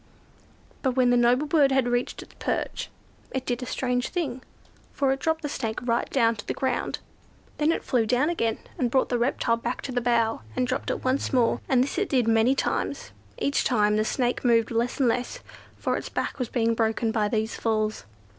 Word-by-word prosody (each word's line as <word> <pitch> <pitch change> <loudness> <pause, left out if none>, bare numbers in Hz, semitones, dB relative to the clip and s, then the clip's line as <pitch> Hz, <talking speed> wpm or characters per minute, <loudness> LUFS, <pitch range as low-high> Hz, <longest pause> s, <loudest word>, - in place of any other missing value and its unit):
But, 260 -2 +1
when 250 -2 +4
the - - +4
noble 245 +4 +3
bird 295 -3 +4
had 265 -2 +2
reached 245 0 -1
its - - -19
perch, - - -2 0.4
it 260 -1 -4
did 245 0 -2
a 250 - -5
strange 250 -1 -1
thing; 280 -9 -3 0.5
for 275 -2 +1
it 270 - -1
dropped 320 +2 0
the - - -1
Snake 225 -6 -3
right 235 -1 0
down 230 -4 +3
to 205 - -9
the - - -2
ground. 260 - -1 0.6
Then 305 +2 +3
it - - -2
flew 235 -4 +1
down 250 +6 +2
again, 230 -10 0 0.2
and 245 - +1
brought 265 +2 +2
the 245 - 0
reptile 235 -1 +1
back 235 +2 -4
to 270 - -4
the 245 -1 0
bough, 230 -2 +1
and 255 - +1
dropped 255 +1 -2
it - - -2
once 260 +2 0
more—and 250 0 +2
this 285 +5 -2
it 400 - -1
did 250 -4 +2
many 225 +3 +4
times. - - -2 0.3
Each 280 - +1
time 210 -4 +2
the 215 - +2
Snake 245 +2 -1
moved 230 -2 +3
less 235 +3 -1
and 265 - +4
less, 245 +2 -1 0.4
for - - -1
its - - -6
back - - -3
was 250 - -2
being 230 -2 +1
broken 225 0 0
by 215 -2 +1
these 220 +1 -1
falls. 215 - -1
245 Hz, 210 wpm, -26 LUFS, 230-265 Hz, 0.6 s, when